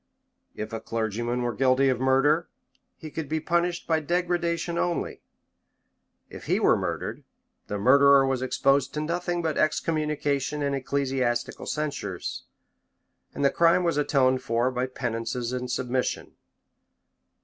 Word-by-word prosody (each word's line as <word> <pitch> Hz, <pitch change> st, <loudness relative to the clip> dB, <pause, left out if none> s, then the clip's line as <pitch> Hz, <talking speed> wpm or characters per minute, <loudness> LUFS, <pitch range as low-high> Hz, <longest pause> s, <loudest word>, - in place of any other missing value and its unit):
If 110 Hz, +1 st, -6 dB
a 115 Hz, -, -2 dB
clergyman 115 Hz, +2 st, -2 dB
were 120 Hz, -1 st, -1 dB
guilty 130 Hz, +3 st, +3 dB
of 125 Hz, -2 st, 0 dB
murder, 135 Hz, +5 st, +2 dB, 0.5 s
he 155 Hz, -, -9 dB
could 155 Hz, -3 st, -5 dB
be 160 Hz, +1 st, 0 dB
punished 170 Hz, +2 st, 0 dB
by 160 Hz, -1 st, +2 dB
degradation 170 Hz, +1 st, -1 dB
only: 175 Hz, -1 st, -2 dB, 1.1 s
if -, -, -11 dB
he -, -, +2 dB
were -, -, +4 dB
murdered, -, -, -4 dB, 0.4 s
the 105 Hz, -, -3 dB
murderer 140 Hz, +5 st, +6 dB
was 135 Hz, -1 st, -1 dB
exposed 135 Hz, +1 st, +1 dB
to 150 Hz, -, -1 dB
nothing 175 Hz, +2 st, -2 dB
but 160 Hz, -2 st, -1 dB
excommunication 150 Hz, -2 st, 0 dB
and 140 Hz, -1 st, 0 dB
ecclesiastical 130 Hz, -3 st, -1 dB
censures; 140 Hz, -, -4 dB, 0.9 s
and 140 Hz, -, 0 dB
the 140 Hz, -, +4 dB
crime 170 Hz, +2 st, +4 dB
was 170 Hz, -4 st, +1 dB
atoned 130 Hz, -3 st, +2 dB
for 120 Hz, +1 st, 0 dB
by 125 Hz, 0 st, -1 dB
penances 120 Hz, -1 st, -3 dB
and 125 Hz, 0 st, -3 dB
submission. 125 Hz, 0 st, -2 dB
135 Hz, 135 wpm, -26 LUFS, 125-155 Hz, 1.1 s, murderer